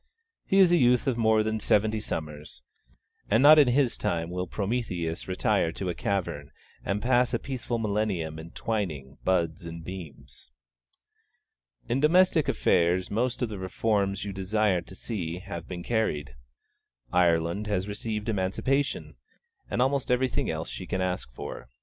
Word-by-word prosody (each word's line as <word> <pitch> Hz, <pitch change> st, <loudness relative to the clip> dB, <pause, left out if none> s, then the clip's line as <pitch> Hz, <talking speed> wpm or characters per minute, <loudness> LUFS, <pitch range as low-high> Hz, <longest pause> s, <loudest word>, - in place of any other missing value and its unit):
he 195 Hz, -, +2 dB
is 190 Hz, -3 st, +7 dB
a 175 Hz, -, +5 dB
youth 125 Hz, -4 st, +4 dB
of 135 Hz, -3 st, +1 dB
more 110 Hz, -2 st, +3 dB
than 110 Hz, 0 st, -1 dB
seventy 110 Hz, +1 st, +2 dB
summers; 75 Hz, -7 st, -6 dB, 0.7 s
and 115 Hz, +5 st, +4 dB
not 155 Hz, +1 st, +9 dB
in 145 Hz, -, +6 dB
his 125 Hz, 0 st, +2 dB
time 85 Hz, 0 st, -1 dB
will 90 Hz, 0 st, -3 dB
Prometheus 95 Hz, -6 st, -2 dB
retire 90 Hz, -3 st, +1 dB
to 95 Hz, -, -3 dB
a -, -, -1 dB
cavern 85 Hz, -7 st, -2 dB, 0.3 s
and 100 Hz, +1 st, -2 dB
pass 125 Hz, 0 st, +3 dB
a -, -, +2 dB
peaceful 125 Hz, -2 st, -4 dB
millennium 100 Hz, -8 st, -1 dB
in 80 Hz, +1 st, -9 dB
twining 80 Hz, -11 st, -4 dB
buds 85 Hz, -3 st, 0 dB
and 85 Hz, 0 st, -7 dB
beams. 85 Hz, -9 st, -9 dB, 1.4 s
In 120 Hz, +3 st, 0 dB
domestic 165 Hz, +1 st, +4 dB
affairs 90 Hz, +2 st, +2 dB
most 120 Hz, +4 st, 0 dB
of 120 Hz, -, -1 dB
the 105 Hz, -3 st, -6 dB
Reforms 100 Hz, +1 st, 0 dB
you 100 Hz, -, -4 dB
desired 95 Hz, -1 st, 0 dB
to 95 Hz, -, -10 dB
see 90 Hz, -7 st, -4 dB
have 90 Hz, -3 st, -7 dB
been 90 Hz, -1 st, -6 dB
carried. 95 Hz, -, -1 dB, 0.8 s
Ireland 85 Hz, +3 st, +2 dB
has 100 Hz, -2 st, -1 dB
received 105 Hz, +1 st, -4 dB
Emancipation, 115 Hz, +8 st, -1 dB, 0.5 s
and 125 Hz, -, +2 dB
almost 135 Hz, 0 st, 0 dB
everything 125 Hz, 0 st, +1 dB
else 80 Hz, +1 st, -3 dB
she 90 Hz, -, -7 dB
can 95 Hz, -, -1 dB
ask 90 Hz, -8 st, -2 dB
for. -, -, -8 dB
100 Hz, 155 wpm, -27 LUFS, 85-120 Hz, 1.4 s, not